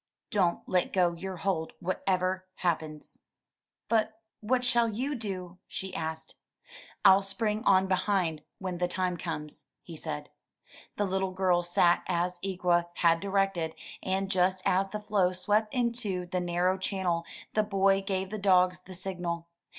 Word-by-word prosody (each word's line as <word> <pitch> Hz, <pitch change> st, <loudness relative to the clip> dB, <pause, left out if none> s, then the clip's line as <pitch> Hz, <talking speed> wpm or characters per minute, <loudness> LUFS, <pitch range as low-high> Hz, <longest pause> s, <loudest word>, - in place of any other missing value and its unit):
Don't 185 Hz, -6 st, +1 dB
let 180 Hz, -1 st, +1 dB
go 180 Hz, -2 st, +3 dB
your 185 Hz, +2 st, -6 dB
hold 165 Hz, -3 st, -1 dB
what 185 Hz, +1 st, -2 dB
ever 185 Hz, 0 st, +1 dB
happens." 155 Hz, -3 st, -3 dB, 0.6 s
But 220 Hz, -1 st, +1 dB, 0.2 s
what 250 Hz, +4 st, +1 dB
shall 240 Hz, -2 st, +3 dB
you 255 Hz, +7 st, -2 dB
do?" 185 Hz, -7 st, -5 dB
she 190 Hz, -1 st, -4 dB
asked. 160 Hz, -1 st, -4 dB, 0.7 s
*T'll 190 Hz, +1 st, +8 dB
spring 210 Hz, +2 st, -1 dB
on 190 Hz, -1 st, +6 dB
behind 185 Hz, -4 st, 0 dB, 0.2 s
when 185 Hz, -2 st, -4 dB
the 180 Hz, -, +2 dB
time 180 Hz, 0 st, -1 dB
comes," 150 Hz, -3 st, -5 dB, 0.2 s
he 170 Hz, -, -9 dB
said. 75 Hz, -, -5 dB, 0.7 s
The 205 Hz, -, +1 dB
little 190 Hz, 0 st, -1 dB
girl 185 Hz, -2 st, +2 dB
sat 175 Hz, 0 st, +3 dB
as 175 Hz, +1 st, 0 dB
Ikwa 180 Hz, -3 st, +1 dB
had 165 Hz, -1 st, +4 dB
directed, 195 Hz, -4 st, 0 dB, 0.3 s
and 190 Hz, +1 st, -1 dB
just 185 Hz, 0 st, +2 dB
as 195 Hz, +2 st, +2 dB
the 210 Hz, -, -4 dB
floe 200 Hz, -4 st, +1 dB
swept 210 Hz, +4 st, +1 dB
into 230 Hz, -7 st, 0 dB
the 180 Hz, +1 st, -2 dB
narrow 180 Hz, +2 st, +1 dB
channel, 185 Hz, -3 st, 0 dB, 0.3 s
the 215 Hz, -, +3 dB
boy 195 Hz, -2 st, +3 dB
gave 190 Hz, -1 st, -2 dB
the 215 Hz, -, -3 dB
dogs 185 Hz, -2 st, +4 dB
the 185 Hz, 0 st, -11 dB
signal. 175 Hz, -2 st, -4 dB
185 Hz, 150 wpm, -29 LUFS, 175-195 Hz, 0.7 s, T'll